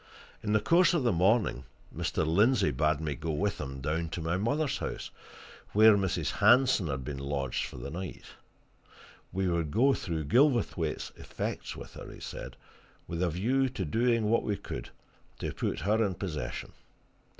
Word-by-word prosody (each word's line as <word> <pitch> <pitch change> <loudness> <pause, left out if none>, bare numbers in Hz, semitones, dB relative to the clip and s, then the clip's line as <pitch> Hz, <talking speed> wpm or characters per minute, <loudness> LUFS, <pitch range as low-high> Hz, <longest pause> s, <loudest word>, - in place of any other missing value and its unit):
In 105 -1 -1
the 110 - +5
course 170 - +4
of 160 - +1
the 120 - +3
morning 95 - +2 0.3
Mr. - - -1
Lindsey 105 +11 +3
bade 75 +2 +1
me 80 -2 -2
go 80 +3 -5
with 95 +5 -1
him 70 -2 -6
down 80 +4 -1
to 85 - -4
my 80 +2 -1
mother's 135 +9 0
house, - - -5 0.6
where 110 +1 +7
Mrs. 95 -2 0
Hanson 125 -7 +4
had 65 -3 -3
been 70 +1 -5
lodged 70 -2 -2
for - - -10
the 70 - -6
night 90 +2 -6 1.1
we 95 +1 0
would 85 -3 0
go 130 - +4
through 80 - -3
Gilverthwaite's 120 - +2
effects - - -5
with - - -10
her, - - -9
he - - -11
said, - - -7 0.5
with 85 0 -3
a 90 - +2
view 125 - +1
to 105 -7 -4
doing 115 +6 +2
what 115 +2 +3
we 105 -2 -2
could - - -7 0.5
to - - -4
put - - -2
her 110 +3 +2
in 95 -4 -1
possession. 85 -5 -4
95 Hz, 170 wpm, -30 LUFS, 80-115 Hz, 1.1 s, where